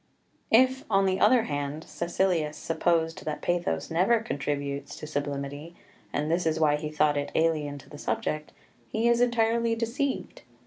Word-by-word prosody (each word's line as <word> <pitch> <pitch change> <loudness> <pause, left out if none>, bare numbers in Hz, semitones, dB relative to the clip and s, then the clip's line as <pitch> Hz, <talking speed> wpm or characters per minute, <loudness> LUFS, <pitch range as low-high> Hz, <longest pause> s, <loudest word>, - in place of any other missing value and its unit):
4 225 - +8
If, 260 +1 -3
on 195 0 +3
the 190 0 +1
other 250 -3 +5
hand, 145 0 -3
Caecilius 170 -3 0
supposed 165 0 0
that 155 -1 -4
pathos 170 - -1
never 190 +8 +3
contributes 140 -8 -3
to - - -7
sublimity, 145 +2 -4 0.4
and 150 +2 -1
this 170 0 +1
is 160 0 +1
why 150 -2 +4
he 150 0 -4
thought 150 -1 +2
it 145 - -2
alien 155 -3 +1
to - - -14
the 145 - -11
subject, 155 0 -2 0.4
he 225 +2 +1
is 235 0 +4
entirely 230 -1 +2
deceived. 250 +5 -2
160 Hz, 165 wpm, -27 LUFS, 145-220 Hz, 0.4 s, 4